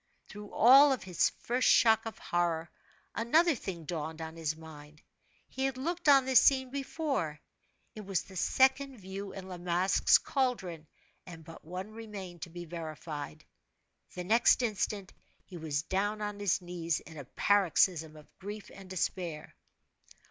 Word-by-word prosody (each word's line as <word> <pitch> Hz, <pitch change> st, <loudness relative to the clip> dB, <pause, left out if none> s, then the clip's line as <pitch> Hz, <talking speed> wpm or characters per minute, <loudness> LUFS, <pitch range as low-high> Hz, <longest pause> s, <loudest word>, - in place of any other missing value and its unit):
Through 210 Hz, 0 st, -10 dB
all 270 Hz, +3 st, +7 dB
his 185 Hz, -6 st, 0 dB
first 250 Hz, +2 st, 0 dB
shock 225 Hz, -1 st, +5 dB
of 225 Hz, -, -7 dB
horror, 170 Hz, -1 st, -1 dB, 0.4 s
another 315 Hz, +9 st, +3 dB
thing 185 Hz, -, -6 dB
dawned 160 Hz, -1 st, -5 dB
on 160 Hz, 0 st, -7 dB
his 155 Hz, -2 st, -2 dB
mind; 155 Hz, -1 st, -13 dB, 0.4 s
he 265 Hz, -, -3 dB
had 270 Hz, -1 st, -2 dB
looked 335 Hz, +4 st, -1 dB
on 275 Hz, -2 st, +6 dB
this 260 Hz, -2 st, +6 dB
scene 260 Hz, -2 st, +3 dB
before. 275 Hz, -, -3 dB, 0.5 s
It 215 Hz, -, -8 dB
was 195 Hz, -2 st, -2 dB
the 190 Hz, -, -14 dB
second 265 Hz, +7 st, +2 dB
view 195 Hz, 0 st, -7 dB
in 190 Hz, -1 st, -9 dB
La 180 Hz, -2 st, -8 dB
Masque's 180 Hz, +2 st, +3 dB
caldron, 190 Hz, -, -2 dB, 0.4 s
and 165 Hz, -2 st, -10 dB
but 165 Hz, 0 st, -12 dB
one 185 Hz, +5 st, -7 dB
remained 205 Hz, -6 st, -9 dB
to 170 Hz, -, -6 dB
be 175 Hz, +1 st, -8 dB
verified. 155 Hz, -2 st, -7 dB, 0.7 s
The 180 Hz, -, -4 dB
next 230 Hz, +6 st, +4 dB
instant, 200 Hz, -3 st, -2 dB, 0.3 s
he 180 Hz, -, -10 dB
was 155 Hz, -2 st, -2 dB
down 205 Hz, +4 st, -1 dB
on 210 Hz, -1 st, -4 dB
his 195 Hz, -2 st, 0 dB
knees 170 Hz, -2 st, -2 dB
in 160 Hz, -, -13 dB
a 145 Hz, -, -6 dB
paroxysm 175 Hz, -3 st, +2 dB
of 150 Hz, -1 st, -17 dB
grief 205 Hz, +2 st, -8 dB
and 195 Hz, -1 st, -12 dB
despair. 175 Hz, -3 st, -3 dB
190 Hz, 155 wpm, -31 LUFS, 165-225 Hz, 0.7 s, all